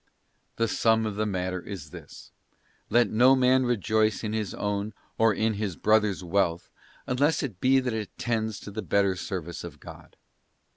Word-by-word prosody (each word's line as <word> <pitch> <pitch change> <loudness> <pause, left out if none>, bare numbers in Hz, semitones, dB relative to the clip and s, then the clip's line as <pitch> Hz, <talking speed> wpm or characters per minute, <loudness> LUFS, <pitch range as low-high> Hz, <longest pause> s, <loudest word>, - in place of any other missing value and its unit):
The 115 - +1
sum 110 0 +2
of 105 -2 -3
the 110 +1 -1
matter 90 -2 -2
is 85 -6 -8
this: - - -12 0.6
let 120 +2 +3
no 125 +4 +6
man 130 0 +3
rejoice 110 -2 +1
in 110 -1 -2
his 110 -4 -3
own 105 +1 -3 0.2
or 115 0 +5
in 110 +2 0
his 100 -4 -3
brother's 105 -2 +2
wealth, 85 -1 0 0.3
unless 145 +6 +1
it 110 -10 -6
be 135 +1 +4
that 125 -3 -2
it 110 -3 -5
tends 110 -3 -2
to 105 - -9
the 110 +2 -4
better 100 -1 +1
service 90 -3 -5
of 80 -4 -9
God. - - -13
110 Hz, 175 wpm, -27 LUFS, 95-115 Hz, 0.6 s, no